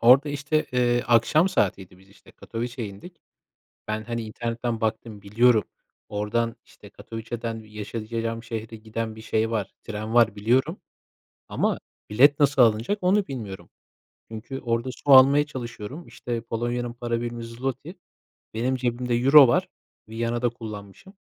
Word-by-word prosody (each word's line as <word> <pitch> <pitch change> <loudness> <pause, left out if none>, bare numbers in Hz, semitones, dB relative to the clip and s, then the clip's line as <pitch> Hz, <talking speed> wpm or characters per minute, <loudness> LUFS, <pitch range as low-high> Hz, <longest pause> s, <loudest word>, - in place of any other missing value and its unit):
Orada 130 +5 +6
işte, 145 +2 -1
eee, 120 -1 +2
akşam 120 - +4
saatiydi 95 - -1
biz 95 +1 -21
işte, - - -19
Katowice'ya 120 0 -5
indik. 160 - -12 0.7
Ben, 110 0 -2
hani, 115 0 -3
internetten 115 +1 -3
baktım 110 -1 -3
biliyorum, 110 +2 +3 0.5
oradan, 115 +3 -1
işte, - - -16
Katowice'dan 115 0 -6
yaşayacağım 115 +2 -5
şehre 115 -1 -6
giden 110 0 -5
bir 110 - -10
şey 110 0 0
var, 110 -3 -2
tren 110 +1 -5
var 115 -3 +4
biliyorum. 130 - +1 0.7
Ama - - 0 0.3
bilet 140 +7 +5
nasıl 145 -2 +4
alınacak 115 - +3
onu 195 +2 +3
bilmiyorum. 110 -8 -7 0.6
Çünkü 115 +5 -7
orada 115 +1 -1
su 145 - -4
almaya 140 +3 +7
çalışıyorum. 130 +3 -7
İşte, 120 -1 -5
Polonya'nın 120 +1 -3
para 120 -1 -3
birimi 120 0 -5
zloty, 130 +6 -5 0.6
benim 125 +4 0
cebimde 125 -1 -1
euro 135 +3 +8
var, 120 - +2 0.4
Viyana'da 115 +2 -1
kullanmışım. 110 - -10
115 Hz, 135 wpm, -25 LUFS, 110-125 Hz, 0.7 s, euro